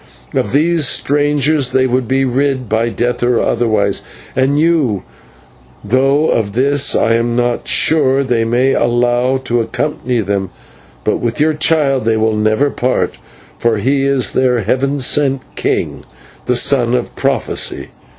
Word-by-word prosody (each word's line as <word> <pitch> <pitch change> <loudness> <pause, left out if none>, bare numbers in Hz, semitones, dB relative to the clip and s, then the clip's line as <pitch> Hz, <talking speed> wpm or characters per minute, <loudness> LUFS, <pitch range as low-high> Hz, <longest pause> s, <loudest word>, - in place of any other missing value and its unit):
Of 100 - -1
these 155 +1 +2
strangers 145 -1 +1
they 130 0 +3
would 125 -1 -1
be 135 +2 +1
rid 130 0 -1
by 110 +2 0
death 120 +1 -2
or 120 -1 +2
otherwise, 110 -4 0 0.3
and 135 +2 +1
you 155 - +1 0.8
though 135 +7 +2
of 100 -3 -1
this 140 +4 +2
I 115 - +2
am 115 +1 0
not 120 0 -1
sure 140 -4 +3
they 120 -3 0
may 125 +4 +1
allow 120 +2 +1
to 120 0 0
accompany 125 0 -2
them; 100 -2 -2 0.5
but - - 0
with 120 +2 -3
your 155 +1 +2
child 150 -5 +1
they 115 -1 +1
will 110 0 +1
never 110 +7 +1
part, 125 +1 -1 0.4
for 115 -2 +1
he 135 +6 0
is 135 -6 +1
their 125 -2 +1
heaven 135 +7 -1
sent 135 0 +1
king, - - -2 0.4
the 125 - +1
Son 125 -1 +2
of 125 - -3
prophecy. - - -2
125 Hz, 150 wpm, -15 LUFS, 115-140 Hz, 0.8 s, they